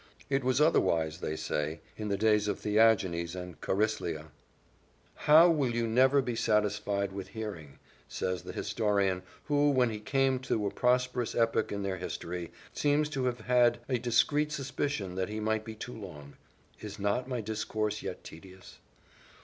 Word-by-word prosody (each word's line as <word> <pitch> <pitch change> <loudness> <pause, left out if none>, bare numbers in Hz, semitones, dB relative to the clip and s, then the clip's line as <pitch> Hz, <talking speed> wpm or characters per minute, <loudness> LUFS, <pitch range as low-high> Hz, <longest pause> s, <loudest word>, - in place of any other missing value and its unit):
It 135 -1 +1
was 130 +2 +2
otherwise, 80 - +2
they 75 - -3
say, 75 +1 -2 0.2
in 105 - -5
the 100 -1 0
days 105 0 +3
of 105 - -1
Theagenes 100 -6 +2
and 90 -1 -8
Chariclea. 85 -7 -1 0.8
"How! 155 +3 +6
will 140 -8 +1
you 120 0 +1
never 130 +4 +4
be 120 -2 -3
satisfied 105 -2 0
with 95 -1 -6
hearing?" 100 -9 -7 0.3
says 90 -2 -3
their 90 +1 -8
historian, 100 -3 0 0.2
who, 145 0 +2
when 125 -4 +3
he 105 - -5
came 135 +4 +1
to 115 -5 -1
a 100 - -1
prosperous 125 -1 +1
epoch 115 -1 +1
in 100 -1 -3
their 95 -1 -2
history, 85 -1 -5 0.2
seems 150 +1 +1
to 135 -4 -2
have 120 -2 -1
had 120 0 +3
a 125 -3 0
discreet 145 +6 +2
suspicion 135 -8 -3
that 95 +1 -2
he 105 +1 -4
might 110 0 0
be 110 0 -8
too 125 +3 -7
long; 75 -10 -10 0.4
"Is 105 -2 -8
not 100 +5 -1
my 125 -2 -2
discourse 110 -1 -2
yet - - -6
tedious?" 95 +3 -13
110 Hz, 165 wpm, -30 LUFS, 95-125 Hz, 0.8 s, How